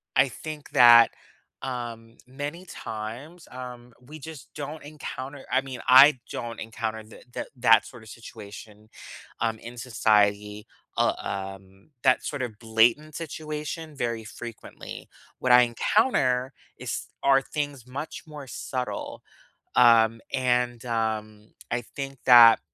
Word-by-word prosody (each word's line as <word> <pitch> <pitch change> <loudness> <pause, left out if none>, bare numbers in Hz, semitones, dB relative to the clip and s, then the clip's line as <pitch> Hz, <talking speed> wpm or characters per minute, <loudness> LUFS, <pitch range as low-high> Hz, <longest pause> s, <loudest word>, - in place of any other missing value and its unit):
I 130 0 +4
think 155 0 -8
that, 120 -1 +8 0.5
um, 115 -3 -6
many 145 +7 -6
times, 125 +9 -8
um, 125 -1 -9
we 150 +5 -12
just 155 -2 -10
don't 150 +1 -6
encounter 140 -2 -8
I 130 - +3
mean, 130 -2 -8
I 130 +1 +8
don't 115 -1 -5
encounter 110 -1 -4
the 110 - -15
that - - -5
that 115 -2 +5
sort 120 -4 -12
of 110 - -14
situation, 105 -1 -12 0.5
um, 115 -1 -1
in 120 +1 -10
society, 105 -3 +1 0.3
uh, - - +3
um, 95 +3 -7
that 130 -1 +4
sort 145 -3 -4
of 110 -4 -6
blatant 115 +7 +2
situation 155 0 -6
very 115 -4 -3
frequently. 115 +1 -9 0.3
What 125 - +1
I 125 0 +9
encounter 125 - +1 0.2
is - - -5 0.2
are 135 -1 +5
things 145 -4 -5
much 140 +5 -7
more 150 -2 -9
subtle, 125 0 -5 0.5
um, 115 -2 +5
and, 125 -2 0
um, 110 -2 -3 0.2
I 120 0 0
think 135 +3 -7
that 120 -2 +9
125 Hz, 130 wpm, -26 LUFS, 115-140 Hz, 0.5 s, I